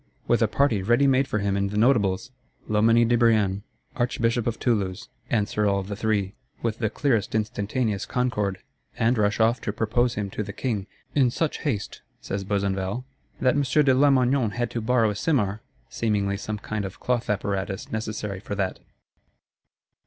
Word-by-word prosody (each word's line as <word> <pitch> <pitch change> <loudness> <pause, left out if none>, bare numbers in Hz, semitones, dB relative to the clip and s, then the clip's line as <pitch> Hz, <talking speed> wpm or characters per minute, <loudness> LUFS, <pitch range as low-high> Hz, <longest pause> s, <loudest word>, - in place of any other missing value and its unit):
With 120 -1 +3
a 115 - +4
party 110 -1 +2
ready 120 +8 +3
made 135 0 +3
for - - -1
him 100 -1 0
in 100 0 +1
the 105 - -3
Notables?—Loménie 115 0 +2
de 120 - +3
Brienne, 110 -5 +3 0.3
Archbishop 120 -1 0
of 115 - -1
Toulouse! 100 -7 -1 0.2
answer 105 -1 +1
all 100 -1 +1
the 100 +1 -5
three, 105 -2 0 0.3
with 115 -1 -1
the 110 -3 +1
clearest 115 -4 0
instantaneous 105 0 -1
concord; 105 -7 -1 0.3
and 115 +2 +3
rush 105 -1 +1
off 115 +2 +3
to - - -2
propose 115 +3 0
him 100 -2 -3
to - - -3
the 100 -1 -5
King; 105 -6 -2 0.3
"in 135 -4 +4
such 155 +5 -1
haste," 115 -10 -3 0.2
says 100 0 -4
Besenval, 100 +3 -1 0.4
"that 130 -1 +4
M. 145 - +2
de 140 0 +3
Lamoignon 130 -3 +3
had 120 -1 -2
to 115 - -3
borrow 115 -1 +2
a - - -5
simarre," 105 -5 0 0.3
seemingly 100 -3 0
some 105 +1 -4
kind 105 0 -4
of 95 -1 -7
cloth 125 -1 -1
apparatus 100 -1 -2
necessary 105 -3 -3
for 105 0 -5
that. 95 -2 -2
110 Hz, 165 wpm, -25 LUFS, 100-120 Hz, 0.4 s, a